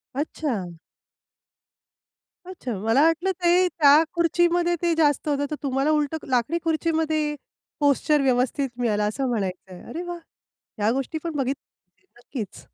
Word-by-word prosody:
अच्छा! 255 - -3 1.7
अच्छा, 355 -9 -6
मला 225 +7 +2
वाटलं 330 +4 +2
ते 360 +1 +4
त्या 300 -2 +5
खुर्चीमध्ये 345 +1 +2
ते 340 -1 +2
जास्त 295 -2 +2
होतं 285 0 0
तर - - -1
तुम्हाला 270 +2 0
उलटं 300 +1 0
लाकडी 250 +6 +1
खुर्चीमध्ये 315 -2 0 0.4
पोश्चर 290 +1 +3
व्यवस्थित 260 +1 +1
मिळाला 210 -3 +1
असं 260 +6 -1
म्हणायचंय. 190 -4 -4
अरे 325 +8 -5
वाह! 350 0 -5 0.6
ह्या 210 +1 +2
गोष्टी 270 +5 -2
पण 330 -3 -4
बघितल्या 275 +7 -6
नक्कीच. 235 -5 -7
290 Hz, 125 wpm, -24 LUFS, 245-330 Hz, 1.7 s, त्या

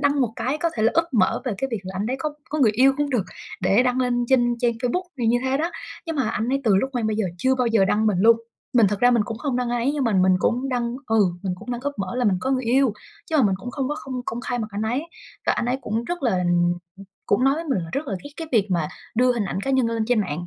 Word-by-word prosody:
đăng 285 0 +2
một 230 -3 +1
cái 275 +5 -1
có 335 -1 0
thể 215 - 0
là 225 - +3
úp 330 0 +4
mở 190 -6 +2
về 250 - -1
cái 270 - -1
việc 225 -4 -2
là 190 0 -7
anh 205 - -1
đấy 260 +2 -1
có 300 -1 -2 0.2
có 305 - -2
người 225 -6 +4
yêu 265 +4 +5
cũng 290 -1 -1
được, 230 -7 +1 0.4
để 210 +5 +4
đăng 255 0 +1
lên 245 -1 +1
trên 240 -2 +3
trang 240 -1 +2
Facebook 250 +10 -2
thì 235 - 0
như 240 +2 +3
thế 265 +1 +1
đó. 330 +4 -1 0.4
Nhưng 325 -2 -3
mà 260 -5 +1
anh 225 +3 -2
ấy 275 +1 +1
từ 205 -4 +4
lúc 265 +7 0
quen 235 -3 -1
bây 215 -1 -1
giờ 220 - 0
chưa 260 +5 +2
bao 250 -2 0
giờ 225 -4 +4
đăng 215 +3 +1
mình 200 -4 +2
luôn. 230 +2 +6 0.4
Mình 230 -4 +6
thật 205 -1 -3
ra 245 0 +6
mình 235 -3 +3
cũng 225 -1 -6
không 270 -3 -2
đăng 250 -1 -1
ai 240 -1 0
ấy, 280 - +2
nhưng 285 -3 -1
mà 225 - +1
mình 185 -1 +4
cũng 250 +7 0
đăng 245 -2 -1
ừ, 225 -1 +1 0.3
mình 185 -2 -2
cũng 250 - -8
đăng 240 0 -3
úp 285 +1 -2
mở 195 - -3
là 250 - 0
mình 195 -4 +3
có 265 - -1
người 260 -1 0
yêu. 255 0 +3 0.4
Chứ 315 - +2
mà 275 - +5
mình 195 -3 +3
cũng 245 +6 -7
không 270 -1 -2
có 295 - -1
không 260 -2 -5
công 235 +2 -3
khai 245 -1 -3
mặt 215 - -3
anh 205 +1 -3
ấy, 245 +7 0 0.4
và - - +4
anh 235 - -1
ấy 255 +2 0
cũng 225 +2 -2
rất 350 0 -4
là 210 -8 +2
ừm, 175 -1 +2 0.5
cũng 245 +6 +2
nói 270 +1 +4
với 330 - -4
mình 275 -10 0
là 165 -2 -5
rất 285 +2 -2
là 200 - -2
ghét 285 - -8
cái 325 -1 -6
việc 210 -3 +3
mà 165 -4 0 0.3
đưa 250 +2 +4
hình 230 -4 -1
ảnh 190 - -3
cá 270 - -2
nhân 260 -3 +3
lên 230 -1 -1
trên 240 -3 +3
mạng, 175 -2 -3
245 Hz, 315 wpm, -23 LUFS, 215-265 Hz, 0.5 s, luôn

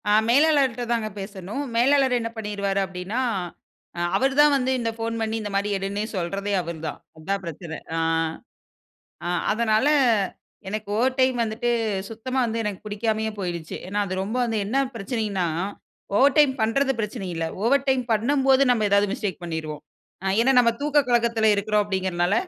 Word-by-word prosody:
ஆ. - - +4 0.2
மேலாளர்ட்ட 275 -3 +3
தாங்க 230 -2 0
பேசணும். 195 +6 -5
மேலாளர் 260 +1 +4
என்ன 230 0 -3
பண்ணிருவாரு 200 -2 -2
அப்டினா, 190 +5 -4 0.8
அ - - -3 0.2
அவரு 270 +7 +2
தான் 295 -1 +6
வந்து 260 0 0
இந்த 230 -1 -1
ஃபோன் 230 0 -2
பண்ணி 220 0 -1
இந்த 210 - -4
மாடி 200 +1 +1
எடுன்னே 195 +2 -3
சொல்றதே 195 +3 -2
அவர் 170 -1 -6
தான். 150 - -6 0.2
அதான் 195 +5 -2
பிரச்சன. 165 0 -6 0.2
ஆ, - - -1 1.3
ஆ. - - -1 0.2
அதனால 220 +2 +2 0.8
எனக்கு 215 +1 -4
ஓவர் 255 +3 +1
டைம் 260 -1 +3
வந்துட்டு, 225 +2 -1 0.4
சுத்தமா 240 +4 -4
வந்து 230 0 -2
எனக்கு 205 -3 -3
பிடிக்காமயே 220 +1 -1
போய்ருச்சு. 175 -4 -4
ஏன்னா 200 +3 -3
அது 185 - -3
ரொம்ப 215 +5 -3
வந்து 225 -2 -1
என்ன 225 +6 -2 0.2
பிரச்சனைனா, 210 -4 -2 0.7
ஓவர் 275 +4 +4
டைம் 295 -3 +6
பண்றது 270 +5 +2
பிரச்சனை 210 -1 -4
இல்ல, 165 0 -2 0.2
ஓவர் 275 +4 +3
டைம் 260 -1 +3
பண்ணும்போது 265 +4 +3
நம்ம 230 -3 +2
ஏதாது 200 0 +4
மிஸ்டேக் 190 -5 -4
பண்ணிருவோம். 155 -3 -5 0.4
ஆ - - -2
ஏன்னா 260 +3 +4
நம்ம 240 -1 +5
தூக்க 295 0 +2
கலக்கத்தில 235 -2 +3
இருக்கிறோம் 210 +1 +1
அப்டிங்கிறனால, 190 -2 0
220 Hz, 160 wpm, -24 LUFS, 195-250 Hz, 1.3 s, தான்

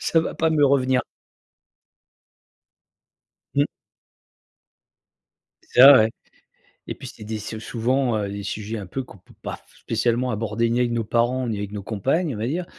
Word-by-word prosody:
Ça 165 - +2
va - - -4
pas 160 0 +2
me 150 -2 +3
revenir. 130 -2 +3 2.6
Mmh. 140 +1 +4 2.0
C'est 125 - +4
ça 140 +2 +11
ouais, 110 0 +4 0.8
et - - -4
puis - - -10
c'est - - -12
des 110 0 -4
sou 110 +1 -6
souvent, 120 +2 0
heu, 100 -1 -2
des 100 0 -6
sujets 105 +3 -4
un 100 - -6
peu 130 +9 -4
qu'on 125 - -15
peut 90 - -22
pas - - -5
f - - -26
spécialement 120 +2 0
aborder 110 +1 -1
ni 120 +1 +1
avec 120 -1 +1
nos 115 -1 0
parents 120 +3 0
ni 110 -3 -2
avec 100 0 -5
nos 105 -1 -6
compagnes 135 - -1
on - - -7
va 110 +2 -2
dire. 170 +6 -2
115 Hz, 175 wpm, -23 LUFS, 110-130 Hz, 2.6 s, ça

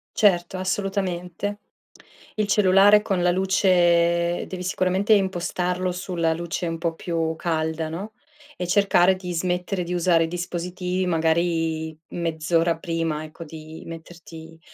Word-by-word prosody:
Certo, 185 -3 +2
assolutamente. 190 0 -2 0.8
Il 215 -1 0
cellulare 205 +1 +5
con 195 -4 -1
la 180 - +4
luce 175 -2 +2
devi 185 -1 -6
sicuramente 185 +3 +1
impostarlo 180 -2 0
sulla 175 -2 -1
luce 170 +1 -3
un 165 - -3
po' 165 0 -1
più 165 -2 -2
calda, 160 -1 -1
no, 190 +7 -6 0.5
e 180 - -3
cercare 190 -1 +4
di 180 -1 -6
smettere 180 +2 -1
di 175 +1 -4
usare 170 -1 +3
i - - -1
dispositivi 180 +1 -3
magari 165 -1 0
mezz'ora 165 0 0
prima, 165 -3 -2
ecco, 155 +2 -9
di 155 +1 -10
metterti 165 -1 -11
175 Hz, 125 wpm, -24 LUFS, 165-185 Hz, 0.8 s, cellulare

